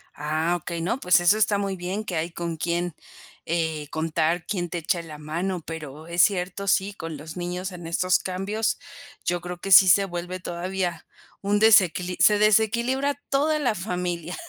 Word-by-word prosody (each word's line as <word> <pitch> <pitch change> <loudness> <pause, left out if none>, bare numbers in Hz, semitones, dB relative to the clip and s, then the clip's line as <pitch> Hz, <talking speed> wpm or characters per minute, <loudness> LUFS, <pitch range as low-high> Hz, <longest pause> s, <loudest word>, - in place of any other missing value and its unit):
Ah, 155 +3 0
okey. 170 +1 -5
No, 230 +10 -1
pues, 180 -4 +4
eso 175 +4 +4
está 205 -1 +2
muy 195 -1 -2
bien 185 +4 -4
que 180 - -4
hay 165 +2 -2
con 170 -1 -4
quién, 175 0 -2 0.5
eh, 160 -2 -2
contar 160 +1 -1
quién 175 -4 -2
te 175 - -3
echa 170 +2 -1
la 160 -2 -10
mano, 170 +5 -3
pero 155 -1 -8
es 170 0 +2
cierto, 195 0 +1
sí, 195 +1 +2
con 165 -5 -7
los 155 +4 -9
niños 180 +2 -4
en 175 -2 -8
estos 180 +2 +2
cambios, 200 +4 -2 0.5
yo 175 0 0
creo 180 0 -6
que 195 - -5
sí 190 0 +9
se 195 +3 +5
vuelve 180 0 -5
todavía 175 -1 -3 0.4
un 205 +1 +1
desequili 185 -4 +4
se 210 -1 +5
desequilibra 235 +6 +2 0.2
toda 300 +3 +2
la 245 -7 +1
familia. 180 -2 -3
180 Hz, 180 wpm, -25 LUFS, 170-200 Hz, 0.5 s, sí